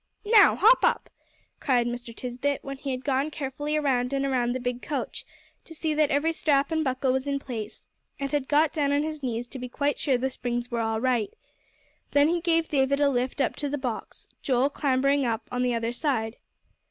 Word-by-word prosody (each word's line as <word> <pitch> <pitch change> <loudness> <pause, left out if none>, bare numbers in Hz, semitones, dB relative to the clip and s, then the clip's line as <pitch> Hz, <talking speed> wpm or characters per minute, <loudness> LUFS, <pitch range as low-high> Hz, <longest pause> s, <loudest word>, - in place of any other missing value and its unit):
"Now, 420 -1 +6
hop 475 +4 +6
up!" - - +1 0.5
cried 250 -4 +2
Mr. 240 0 -5
Tisbett, 255 +4 -3
when 275 0 -6
he 275 +1 -6
had 255 -1 -4
gone 275 +1 +1
carefully 295 +1 -3
around 260 -3 0
and 275 0 0
around 245 -3 +1
the 255 - -2
big 245 0 -3
coach, 290 -3 -4 0.4
to 325 - -11
see 315 0 -1
that 300 -1 +2
every 310 +4 +1
strap 285 -2 +1
and 315 -1 +1
buckle 260 -1 0
was 265 +1 -1
in 280 0 0
place, 230 -5 -7 0.3
and 275 0 -3
had 290 -3 -1
got 305 +1 +3
down 285 -3 +1
on 285 +1 +2
his 310 -1 -4
knees 240 -2 -2
to 265 - -8
be 250 0 -6
quite 285 +3 -1
sure 270 -4 +2
the 265 +2 -2
springs 240 0 -3
were 235 -1 0
all 225 0 -1
right. 240 -4 0 0.8
Then 290 +1 +5
he 345 0 0
gave 330 -1 +2
David 280 -1 +1
a 290 -1 +4
lift 255 +2 -1
up 265 - 0
to 290 - -2
the 290 - -2
box, 250 -5 -5
Joel 265 +1 +1
clambering 275 0 +1
up 230 -2 -2
on 250 0 -1
the 250 -1 +1
other 230 +1 -2
side. 240 -5 -1
270 Hz, 215 wpm, -26 LUFS, 245-290 Hz, 0.8 s, Now